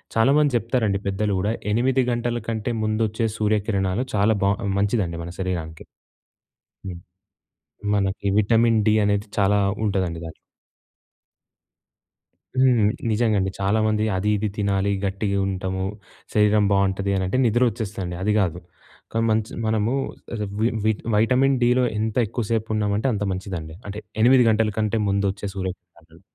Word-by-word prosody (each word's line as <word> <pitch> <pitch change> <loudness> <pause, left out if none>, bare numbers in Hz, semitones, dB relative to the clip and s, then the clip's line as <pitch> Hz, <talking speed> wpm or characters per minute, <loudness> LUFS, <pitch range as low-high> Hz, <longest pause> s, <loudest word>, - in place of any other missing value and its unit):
చాలామంది 140 +3 +3
చెప్తారండి 110 -4 0
పెద్దలు 100 +1 0
కూడా. 105 +3 0 0.2
8 130 +3 +2
గంటల 120 0 -1
కంటే 115 +1 -2
ముందొచ్చే 110 +1 0
సూర్యకిరణాలు 105 0 0
చాలా 105 +2 +3
బా 100 - +4 0.3
మంచిదండి 100 -5 0
మన 85 - -7
శరీరానికి. 85 -4 -4 1.0
హ్మ్. 90 -2 -6 1.0
మనకి 100 0 -1
విటమిన్ 115 +1 +3
డి 110 - +4
అనేది 100 +1 0
చాలా 100 +1 +3 0.3
ఉంటదండి 90 -5 -1
దాంట్లొ. 80 - -8 2.3
హ్మ్. 120 -5 +4 0.2
నిజంగా 110 -1 +2
అండి. 95 0 -1
చాలా 100 +3 +1
మంది 110 0 +1
అది 105 +3 0
ఇది 105 0 -1
తినాలి 100 -1 0
గట్టిగా 100 +1 -1
ఉంటాము. 95 0 -3 0.5
శరీరం 105 -1 +4
బావుంటది 100 0 +1
అని 95 - 0
అంటే 130 - 0
నిద్ర 120 +2 +3
వచ్చేస్తదండి. 95 -5 -5
అది 105 +1 +2
కాదు. 90 -3 0 0.5
కానీ 115 0 +1
మంచ్ 110 0 0 0.2
మనము 110 +2 +1 0.7
వి 115 - +3 0.2
వి 110 - +4 0.2
వైటమిన్ 130 +5 +3
డి‌లో 125 +1 +3 0.2
ఎంత 110 0 -2
ఎక్కువ 115 +1 -3
సేపు 110 -1 0
ఉన్నామంటే 105 +3 0
అంత 105 0 -2
మంచిదండి. 90 -5 -6
అంటే 100 +1 -5 0.2
8 125 +1 +6
గంటల 110 0 +1
కంటే 110 +1 0
ముందొచ్చే 100 0 -1
సూర్యకిరణాలలో. 90 -3 -8
105 Hz, 135 wpm, -23 LUFS, 95-115 Hz, 2.3 s, 8